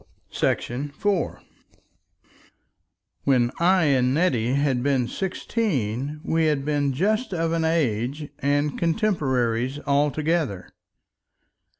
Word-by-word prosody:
§ 140 Hz, +4 st, -1 dB
4 200 Hz, -3 st, -1 dB, 1.8 s
When 125 Hz, -3 st, +3 dB
I 180 Hz, +1 st, +4 dB
and 130 Hz, -3 st, +2 dB
Nettie 130 Hz, -8 st, +1 dB
had 140 Hz, -3 st, +1 dB
been 130 Hz, -2 st, +1 dB
sixteen 150 Hz, -, -2 dB
we 165 Hz, 0 st, +1 dB
had 145 Hz, -3 st, 0 dB
been 145 Hz, -2 st, +1 dB
just 210 Hz, -, 0 dB
of 165 Hz, -1 st, 0 dB
an 165 Hz, -1 st, 0 dB
age 145 Hz, -3 st, 0 dB
and 145 Hz, +1 st, 0 dB
contemporaries 135 Hz, -, 0 dB
altogether. 145 Hz, -, 0 dB
145 Hz, 95 wpm, -24 LUFS, 130-165 Hz, 1.8 s, I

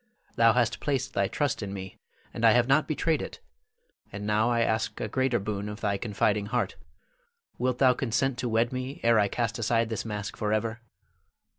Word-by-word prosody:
Thou 115 Hz, -1 st, +5 dB
hast 120 Hz, -2 st, +1 dB
placed 135 Hz, -3 st, -1 dB
thy 100 Hz, -, +1 dB
trust 145 Hz, +3 st, -1 dB
in 100 Hz, -1 st, -5 dB
me, 95 Hz, -1 st, -8 dB, 0.3 s
and 115 Hz, -, -5 dB
I 115 Hz, -1 st, +7 dB
have 120 Hz, 0 st, +3 dB
not 140 Hz, +3 st, +3 dB
betrayed 155 Hz, -1 st, 0 dB
it, -, -, -7 dB, 0.7 s
and 105 Hz, 0 st, -6 dB
now 105 Hz, +2 st, +2 dB
I 120 Hz, -1 st, +2 dB
ask 110 Hz, -1 st, 0 dB
a -, -, -2 dB
greater 130 Hz, +2 st, +1 dB
boon 100 Hz, 0 st, -3 dB
of 105 Hz, +1 st, -8 dB
thy 100 Hz, -2 st, 0 dB
confiding 105 Hz, -1 st, 0 dB
heart. -, -, -1 dB, 0.8 s
Wilt 125 Hz, 0 st, 0 dB
thou 130 Hz, -1 st, +5 dB
consent 125 Hz, +1 st, -1 dB
to 125 Hz, -, -1 dB
wed 115 Hz, +2 st, +1 dB
me 130 Hz, +2 st, -4 dB
ere 115 Hz, -1 st, +5 dB
I 100 Hz, -, +3 dB
cast 115 Hz, +2 st, -2 dB
aside 115 Hz, 0 st, +1 dB
this 110 Hz, -, -3 dB
mask 105 Hz, -2 st, -5 dB
forever? 110 Hz, +2 st, -1 dB
115 Hz, 190 wpm, -28 LUFS, 105-125 Hz, 0.8 s, I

